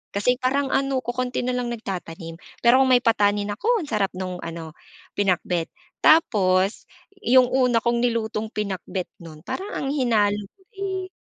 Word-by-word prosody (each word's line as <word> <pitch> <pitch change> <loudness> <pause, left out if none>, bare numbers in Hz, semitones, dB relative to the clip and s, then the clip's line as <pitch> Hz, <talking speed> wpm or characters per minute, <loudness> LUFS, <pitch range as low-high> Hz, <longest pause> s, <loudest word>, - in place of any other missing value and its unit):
kasi 250 +5 +2
parang 270 +2 +1
ano 270 -1 +1
kokonti 250 +1 -2
na 250 0 -1
lang 245 -1 -2
nagtatanim. 170 -6 -6 0.3
Pero 250 +3 +6
kung 260 - +2
may 250 - +6
patani, 205 -2 +2
nako 440 - 0
ang 310 - -7
sarap 210 -4 0
nung 185 -1 -4
ano 165 -1 -7 0.4
pinakbet, 180 -3 0 0.3
tapos 195 - +3 0.4
'yung 255 +1 +6
una 250 -3 +3
kong 235 0 +1
nilutong 220 -2 -1
pinakbet 195 -2 -3 0.2
nun 155 -2 -11
parang 395 +3 -5
ang 275 - -3
hinalo 215 -7 +2 0.2
ko 390 - -31 0.2
eh 380 -1 -3
230 Hz, 155 wpm, -23 LUFS, 195-255 Hz, 0.4 s, Pero